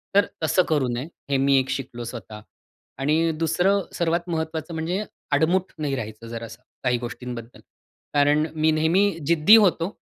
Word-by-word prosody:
तर 200 0 +6 0.2
तसं 170 +4 +3
करू 145 -5 +2
नये, 125 +5 -4 0.2
हे 140 - +2
मी 135 +1 +3
एक 130 - -2
शिकलो 120 -3 -4
स्वतः 110 -2 -8 0.6
आणि 155 +4 +2
दुसरं 180 +5 +2
सर्वात 170 +1 0
महत्वाचं 160 0 -3
म्हणजे 170 +5 -2 0.3
आडमुठ 170 +6 +2
नाही 145 -3 -2
राहायचं 110 -2 -7
जरा 115 0 -6
असं, 115 +2 -12 0.2
काही 125 -1 +2
गोष्टींबद्दल. 120 -1 -7 0.5
कारण 145 +1 +3
मी 155 0 +3
नेहमी 165 +6 +3 0.2
जिद्दी 170 +6 +7
होतो 195 -3 +3
155 Hz, 155 wpm, -24 LUFS, 125-170 Hz, 0.6 s, जिद्दी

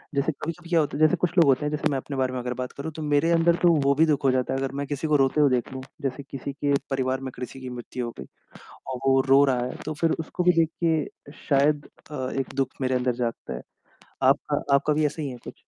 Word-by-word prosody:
जैसे 140 +3 +1
कभी-कभी 165 +4 -7
क्या 170 - +4
होता 150 -2 -1
है - - -3
जैसे 155 -1 +5
कुछ 180 - +2
लोग 165 - +7
होते 135 +1 +3
हैं, 150 - +1
जैसे 150 +1 0
मैं 135 - 0
अपने 135 +1 -5
बारे 130 -1 0
में 125 - -2
अगर 125 0 -3
बात 125 0 -5
करूँ 155 +3 -6
तो 160 - -6
मेरे 150 +2 +2
अंदर 170 0 +4
तो 175 -1 +6
वो 140 - +4
भी 160 +3 +5
दुःख 150 -3 +1
हो 135 - +4
जाता 130 0 0
है, 135 - -1
अगर 135 0 -2
मैं 140 - -2
किसी 145 +2 -3
को 150 - +3
रोते 135 +3 +2
हुए 145 - +5
देख 125 0 0
लूँ, 130 - -5 0.2
जैसे 135 +1 -3
किसी 135 0 -6
के 145 0 0 0.2
परिवार 130 -1 0
में 130 - -5
कृषि 125 +2 -7
की 130 -1 -7
मृत्यु 125 0 -5
हो 120 - -5
गई 65 - -6 0.7
और 130 - -4
वो 135 0 +5
रो 140 +1 +7
रहा 130 -3 +2
है, - - -6
तो 155 - -3
फिर 165 -1 +3
उसको 160 +3 -3
भी 180 - +6
देख 160 - 0 0.2
के 155 -3 -1 0.2
शायद 145 +1 +3 0.2
अ, 130 -3 -3
एक 135 - -5
दुःख 135 -2 +1
मेरे 130 0 0
अंदर 125 -1 +1
जागता 120 - -4
है। - - -5 0.6
आपका 145 +2 +2
आपका 150 +2 +2
भी 150 0 +1
ऐसा 150 +2 -2
ही 145 - -3
है 125 - -7
कुछ? - - -8
140 Hz, 275 wpm, -25 LUFS, 130-150 Hz, 0.7 s, लोग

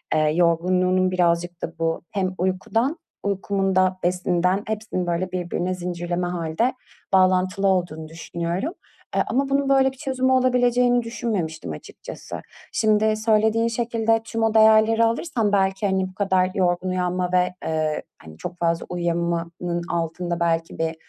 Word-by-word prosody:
eee, 155 -1 +3
yorgunluğunun 180 +2 +2
birazcık 175 -1 0
da 165 0 -5
bu 165 0 0
hem 185 -2 -1
uykudan, 225 - 0 0.3
uykumun 195 -1 -1
da 185 0 +3
besinden, 180 +2 +1
hepsinin, 215 -4 -3
böyle, 175 +2 -1
birbirine 180 0 -2
zincirleme 175 0 -3
hâlde 175 +8 -1 0.4
bağlantılı 185 +1 +3
olduğunu 175 -4 0
düşünüyorum. 170 - -3 0.4
Eee, - - +3
ama 275 +2 0
bunun 275 0 +1
böyle 265 -1 +4
bir 265 - -18
çözümü 260 -2 0
olabileceğini 245 -1 +3
düşünmemiştim 210 - -3
açıkçası. 75 - -8 0.3
Şimdi 215 0 +3
söylediğin 220 +1 +2
şekilde 225 -1 0
tüm 225 0 -2
o 225 -1 +2
değerleri 220 +1 +5
alırsam 230 -1 0
belki, 195 0 +2
hani, 190 -1 0
bu - - -16
kadar 190 -2 +2
yorgun 180 -1 +1
uyanma 180 0 -1
ve, 180 0 +2
eee, 155 -1 -1 0.2
hani, 80 0 -12
çok 180 0 -6
fazla 170 -1 0
uyuyamamanın 170 0 -2
altında 170 +1 -2
belki 165 -1 -1
bir 160 0 -1
185 Hz, 140 wpm, -23 LUFS, 175-220 Hz, 0.4 s, değerleri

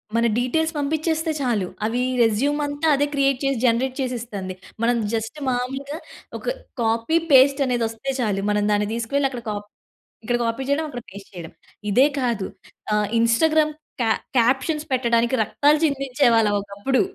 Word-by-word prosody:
మన 230 0 +3
డీటేల్స్ 320 +7 0
పంపిచ్చేస్తే 315 +2 0
చాలు, 225 -8 0 0.2
అవీ 235 +3 0 0.2
రెజ్యూమంతా 290 +7 0
అదే 285 - +2
క్రియేట్ 275 -2 +2
చేసి, 275 -2 +1
జనరేట్ 250 +2 +1
చేసిస్తంది. 230 -7 -4 0.3
మనం 240 0 +3 0.2
జస్ట్ 225 +6 -3
మామూలుగా 270 +4 -3 0.4
ఒక - - -12 0.4
కాపీ, 230 +7 +1
పేస్టనేదొస్తే 260 -3 +3
చాలు. 205 -5 0
మనం 210 0 +1
దాన్ని 205 0 +1
దీసుకువెళ్ళక్కడ 250 +2 -1
కాప్ 205 0 -5 0.6
ఇక్కడ 240 +2 0
కాపీ 230 +3 -2
చేయడం, 310 +3 +1
అక్కడ 245 -4 -6
పేస్ట్ 195 0 -11
చేయడం. 170 -2 -8 0.4
ఇదే 255 +7 +6
కాదు, 235 -7 -1 0.5
ఆహ్, 210 -1 +2
ఇన్‌స్టాగ్రామ్ 305 +7 +3 0.3
క్యా 225 -2 +2 0.3
క్యాప్షన్స్ 265 +6 +2
పెట్టడానికి 235 -1 +2
రక్తాలు 290 +8 +3
చందించేవాళ్ళుం 255 -6 +2
ఒకప్పుడు. 205 +7 -1
250 Hz, 135 wpm, -22 LUFS, 225-280 Hz, 0.6 s, ఇదే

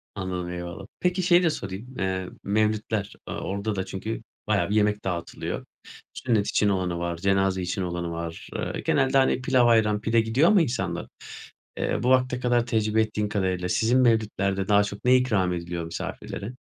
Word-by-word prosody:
Anladım, 90 -2 -3
eyvallah. 90 +2 -6
Peki 180 +1 +1
şeyi 175 0 +5
de 170 - +4
sorayım: 110 -1 -6
Eee, 95 -1 -1
mevlitler, 105 0 0
aaa, - - -5
orada 100 +2 -3
da 95 - -2
çünkü 100 +4 -5 0.2
bayağı 100 -4 +1
bir 105 - 0
yemek 105 0 +2
dağıtılıyor. 85 -3 -4 0.5
Sünnet 110 -5 0
için 105 - +2
olanı 90 -3 -1
var, 85 -1 -2
cenaze 95 0 +1
için 90 +2 -2
olanı 85 -1 -3
var. 85 0 -6
Eee, - - -3
genelde, 135 -1 +3
hani, 130 -1 +3
pilav, 130 -1 +3
ayran, 110 -2 +3
pide 115 +1 +3
gidiyor 120 +9 +3
ama 210 -5 +6
insanlar. 130 -5 -2 0.7
Eee, - - -1
bu 125 - +2
vakte 130 -1 +3
kadar 120 -1 +2
tecrübe 110 -1 +1
ettiğin 105 -1 -1
kadarıyla 95 -3 -1
sizin 120 +6 +3
mevlitlerde 100 -5 +1
daha 105 -1 +5
çok 100 +2 -7
ne 125 +1 +6
ikram 105 -8 +1
ediliyor 85 -1 -4
misafirlere? 100 +6 -6
105 Hz, 175 wpm, -26 LUFS, 95-120 Hz, 0.7 s, ama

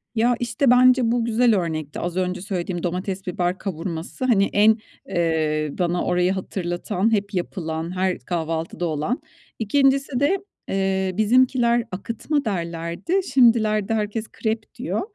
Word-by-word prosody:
Ya, 235 +2 +3
işte 240 +3 +1
bence 250 -1 +5
bu 240 -1 +1
güzel 235 -1 +3
örnekti. 155 -4 -4
Az 175 +1 -3
önce 180 0 -1
söylediğim, 180 -3 -3
domates, 185 +2 -3
biber 180 +1 -1
kavurması 170 +4 -4
hani 205 -6 +3
en, 215 +2 +5 0.3
ııı, 155 -4 0
bana 175 0 0
orayı 180 +1 +2
hatırlatan, 185 +2 -2
hep 200 0 0
yapılan, 170 -2 -3
her 185 0 0
kahvaltıda 165 0 -3
olan. 155 - -1 0.4
İkincisi 270 +3 +2
de, 300 +8 +3 0.3
eee, 190 -1 0
bizimkiler 240 +1 +3
akıtma 230 +9 -2
derlerdi. 170 - -2
Şimdilerde 225 -4 +4
herkes 215 +1 -2
krep 220 +1 -3
diyor. 245 +8 -2
195 Hz, 130 wpm, -23 LUFS, 175-235 Hz, 0.4 s, bence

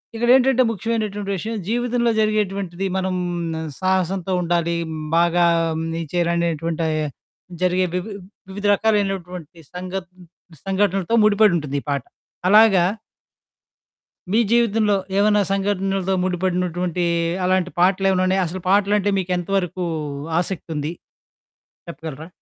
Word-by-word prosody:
ఇక్కడేంటంటే 255 +2 +4
ముఖ్యమైనటువంటి 210 -2 -3
విషయం, 225 +5 -4
జీవితంలో 240 0 +1
జరిగేటువంటిది 195 -3 -1
మనం 185 0 -1 0.7
సాహసంతో 185 0 0
ఉండాలీ, 170 -1 0
హ్మ్. 155 -1 -5
బాగా 170 0 +3 0.3
హ్మ్. 160 +1 -3
నీచేలనేటువంటయి 165 -1 -1 0.6
జరిగే 185 0 +2
వివి 180 +4 -3 0.4
వివిధ 205 +2 -6
రకాలైనటువంటి 190 -6 -1
సంఘటన్ 185 0 -7 0.4
సంఘటనలతో 195 0 0
ముడిపడుంటుందీ 185 -9 +3
ఈ - - -24
పాట. 140 -1 0 0.5
అలాగా 210 -2 +6 1.5
మీ 220 - +3
జీవితంలో 225 -3 +3 0.2
ఏదన్నా 210 0 +4
సంఘటనలతో 195 -1 0
ముడిపడినటువంటీ 180 -1 -1 0.4
అలాంటి 185 -1 +1
పాటలేవన్నునాయా? 190 0 +2
అసలు 185 +3 -6
పాటలంటే 205 +1 +3
మీకెంత 180 -1 -2
వరుకూ 180 -1 -2 0.5
ఆసక్తుంది, 160 -4 -3 1.0
చెప్పగలరా? 160 -2 -8
185 Hz, 95 wpm, -21 LUFS, 175-205 Hz, 1.5 s, అలాగా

